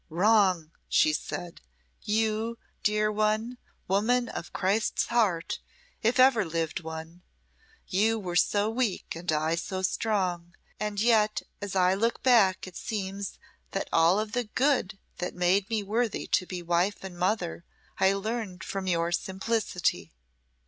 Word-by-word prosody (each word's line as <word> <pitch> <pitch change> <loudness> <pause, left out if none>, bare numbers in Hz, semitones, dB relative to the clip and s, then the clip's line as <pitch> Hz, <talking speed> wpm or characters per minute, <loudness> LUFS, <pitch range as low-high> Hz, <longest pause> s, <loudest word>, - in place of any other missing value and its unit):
"Wrong!" 185 -2 +3 0.2
she 155 - +4
said 175 +2 -5 0.4
"you! 220 +2 0 0.2
dear 210 0 +2
one 215 +3 0 0.3
woman 235 +6 +2
of 175 - -6
Christ's 200 +4 +1
heart, 210 -9 +1 0.4
if 240 +3 +2
ever 255 -4 +6
lived 165 -1 -2
one. 160 +1 -8 0.6
You 220 +4 +2
were 180 -5 -4
so 205 +3 +3
weak 225 -6 -1
and 170 0 -2
I 155 +1 +1
so 185 +3 -3
strong, 185 -4 -1 0.2
and 210 -1 -2
yet 215 -1 +3 0.2
as 200 -1 -5
I 185 0 +4
look 230 +4 0
back 220 -8 +4
it 185 -2 -11
seems 200 -2 -4 0.4
that 195 - -2
all 165 +4 +5
of 215 +1 -3 0.2
good 255 -8 +2 0.2
that 180 - -3
made 180 +2 +2
me 220 -2 0
worthy 220 +3 -1
to 185 - +2
be 180 -2 -5
wife 175 +4 0
and 190 -2 -7
mother 180 -2 -1 0.4
I 190 +1 +4
learned 200 -2 -4
from 195 -1 -4
your 170 -1 +1
simplicity." 190 - -1
195 Hz, 140 wpm, -28 LUFS, 175-220 Hz, 0.6 s, ever